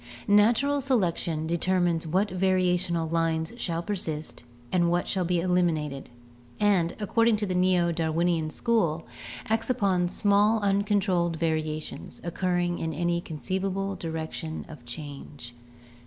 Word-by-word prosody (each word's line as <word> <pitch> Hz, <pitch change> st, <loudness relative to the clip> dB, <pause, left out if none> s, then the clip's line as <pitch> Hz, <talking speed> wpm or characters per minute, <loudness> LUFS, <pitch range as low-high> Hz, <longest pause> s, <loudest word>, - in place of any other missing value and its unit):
Natural 235 Hz, +8 st, +4 dB
selection 175 Hz, -, 0 dB
determines 170 Hz, 0 st, +1 dB
what 190 Hz, +6 st, +1 dB
variational 180 Hz, -3 st, +1 dB
lines 165 Hz, 0 st, 0 dB
shall 170 Hz, -6 st, -2 dB
persist 160 Hz, -6 st, -4 dB, 0.3 s
and 175 Hz, -2 st, +3 dB
what 175 Hz, +1 st, 0 dB
shall 185 Hz, -, 0 dB
be 175 Hz, 0 st, +1 dB
eliminated, 165 Hz, -6 st, 0 dB, 0.5 s
and, 190 Hz, -5 st, +2 dB
according 230 Hz, +2 st, +3 dB
to 210 Hz, -, -1 dB
the 185 Hz, -, -2 dB
Neo 180 Hz, -1 st, +3 dB
Darwinian 165 Hz, 0 st, 0 dB
school, 170 Hz, -6 st, 0 dB, 0.4 s
acts 225 Hz, +2 st, 0 dB
upon 190 Hz, -7 st, +2 dB
small 205 Hz, +3 st, +3 dB
uncontrolled 195 Hz, -4 st, +1 dB
variations, 155 Hz, -1 st, -3 dB
occurring 175 Hz, 0 st, -1 dB
in 160 Hz, -1 st, -2 dB
any 170 Hz, +1 st, 0 dB
con 160 Hz, -3 st, -7 dB
ceivable 195 Hz, +2 st, -2 dB
direction 160 Hz, -1 st, -5 dB
of 150 Hz, -6 st, -11 dB
change. 140 Hz, -2 st, -8 dB
175 Hz, 125 wpm, -27 LUFS, 160-195 Hz, 0.5 s, Natural